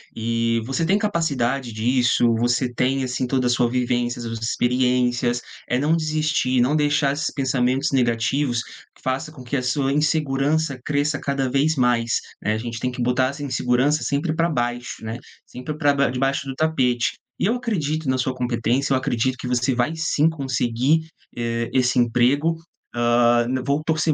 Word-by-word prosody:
e 115 0 0
você 135 +6 -1
tem 195 +4 +3
capacidade 140 - -1
disso, 120 +2 +2
você 120 +1 0
tem, 130 +2 0
assim, 125 0 -2
toda 130 -1 +1
a - - +1
sua 120 -1 +2
vivência, 120 -1 -1
suas 115 -1 -5
experiências. 120 +1 +1 0.3
É 125 - +1
não 150 +4 +2
desistir, 155 -5 0
não 135 +5 +2
deixar 145 -2 +2
esses 150 +5 -2
pensamentos 130 0 0
negativos 120 +1 +1
que - - -17
faça 135 +4 -2
com 130 -5 -12
que 125 +3 -4
a - - -1
sua 135 +2 0
insegurança 150 -1 +1
cresça 145 0 0
cada 135 -2 -1
vez 145 +4 +2
mais, 120 -2 +2 0.2
né, 105 - 0
a 110 - -1
gente 115 0 -5
tem 125 +1 -2
que 125 - -5
botar 125 +1 +2
essa 145 +1 -7
insegurança 135 +2 +1
sempre 155 +3 -1
pra 170 +1 +1
baixo, 120 -4 -3
né, 110 +1 -4 0.3
sempre 135 +5 -7
pra 145 -3 +3
ba 140 -2 +2
debaixo 135 +2 -1
do 135 - -3
tapete. 130 -6 +1 0.3
E - - +1
eu 230 - +1
acredito 160 - -2
na 130 - +1
sua 130 0 -1
competência, 125 +2 0
eu 130 - +3
acredito 130 -1 0
que 125 - -6
você 125 +1 +1
vai 120 +4 0
sim 160 -1 +2
conseguir, 130 -1 0 0.4
eh, 115 0 -2
esse 125 -1 +2
emprego, 125 +7 +2 0.4
hã, 120 0 +3
n 130 0 -1
vou 140 +2 +1
torcer 160 0 +1
130 Hz, 175 wpm, -22 LUFS, 120-145 Hz, 0.4 s, tem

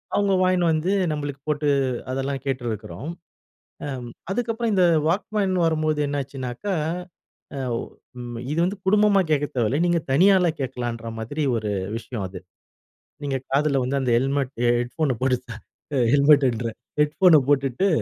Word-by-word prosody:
அவங்க 200 -1 +2
வாங்கின்னு 180 -2 +3
வந்து 160 +5 0 0.2
நம்பளுக்கு 145 -2 -4
போட்டு, 150 0 +1 0.4
அதெல்லாம் 135 +1 -2
கேட்டுருக்குறோம். 120 +1 -4 0.8
அம் 130 -4 -5 0.2
அதுக்கப்புறம் 230 +1 -1
இந்த 185 -2 +4 0.2
வாக்மேன் 195 +2 0
வரும்போது 155 -1 +1
என்ன 145 0 -1
ஆச்சுன்னாக்கா, 135 +8 -4 0.9
அவு 120 -2 -1 0.4
ம் 120 -1 -6
இது 155 - -2
வந்து 195 +3 -2
குடும்பமா 205 0 +4
கேட்க 145 -1 +2
தேவைல்ல, 125 +5 +1
நீங்க 170 -1 +2
தனியாளா 180 +3 +5
கேட்கலாம்ன்ற 120 -3 -4
மாதிரி 145 +8 -3
ஒரு 105 -2 -2 0.2
விஷயம் 115 -2 -5
அது. 90 -1 -9 0.8
நீங்க 135 -2 -1
காதுல 140 0 +2
வந்து 135 +2 0
அந்த 125 -2 0
ஹெல்மெட், 135 +1 -1 0.3
ஹெட் 120 0 -3
ஃபோன 150 -6 +1
போட்டு, 130 -1 +2 0.7
ஹெல்மெட்டுன்றேன். 135 -6 +3 0.2
ஹெட் 150 0 +2
ஃபோன 175 -5 +7
போட்டுட்டு, 140 +6 +2
140 Hz, 135 wpm, -24 LUFS, 125-170 Hz, 0.9 s, ஃபோன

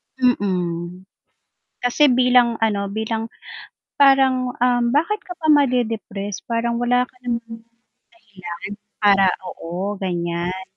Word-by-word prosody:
Mm, 180 -8 -1 0.8
kasi 265 +4 +4
bilang, 250 -1 +4
ano, 200 -2 0
bilang 220 +2 -3 0.7
parang, 265 -2 +4
um, 245 -1 +3
bakit 335 +9 +1
ka 360 - -6
pa 315 -3 -3
made-depress 225 -8 0
parang 235 0 -1
wala 245 +1 +2
ka 250 - -22
namang 235 -1 -1
dahilan 230 0 -13 1.2
para 200 -2 +4 0.2
oo, 180 +3 -5
ganyan, 175 0 -2
230 Hz, 105 wpm, -21 LUFS, 195-250 Hz, 1.2 s, kasi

